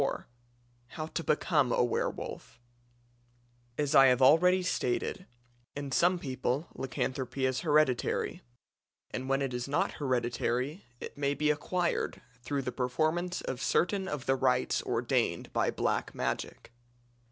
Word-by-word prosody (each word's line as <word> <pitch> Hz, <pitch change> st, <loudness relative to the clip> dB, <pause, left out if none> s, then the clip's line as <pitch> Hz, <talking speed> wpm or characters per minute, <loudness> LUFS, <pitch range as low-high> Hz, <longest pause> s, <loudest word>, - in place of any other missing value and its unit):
CHAPTER 140 Hz, -, +1 dB
IV -, -, -19 dB, 0.7 s
HOW 155 Hz, -, -3 dB
TO 165 Hz, +1 st, -4 dB
BECOME 145 Hz, -4 st, +2 dB
A -, -, +3 dB
WERWOLF 120 Hz, 0 st, -3 dB, 1.2 s
As 145 Hz, -2 st, 0 dB
I 135 Hz, 0 st, +8 dB
have 125 Hz, -1 st, +4 dB
already 180 Hz, +7 st, +5 dB
stated, 180 Hz, +3 st, -1 dB, 0.5 s
in 140 Hz, -1 st, -5 dB
some 175 Hz, +6 st, +3 dB
people 130 Hz, 0 st, -2 dB
lycanthropy 130 Hz, 0 st, -2 dB
is 130 Hz, 0 st, 0 dB
hereditary; 150 Hz, -5 st, +1 dB, 0.7 s
and 130 Hz, +1 st, -4 dB
when 135 Hz, +1 st, +2 dB
it 135 Hz, -2 st, -2 dB
is 125 Hz, +1 st, -3 dB
not 145 Hz, -, +1 dB
hereditary 125 Hz, +4 st, -1 dB
it -, -, -8 dB
may 140 Hz, 0 st, +1 dB
be 150 Hz, +1 st, +2 dB
acquired 170 Hz, +4 st, -1 dB, 0.2 s
through 140 Hz, +2 st, -2 dB
the 125 Hz, -, -3 dB
performance 155 Hz, +9 st, -1 dB
of 130 Hz, -1 st, -4 dB
certain 190 Hz, +6 st, +1 dB
of 150 Hz, -7 st, -4 dB
the 135 Hz, -, +3 dB
rites 125 Hz, -1 st, +1 dB
ordained -, -, -1 dB
by -, -, +2 dB
Black -, -, -1 dB
Magic. -, -, -3 dB
140 Hz, 140 wpm, -30 LUFS, 130-155 Hz, 1.2 s, I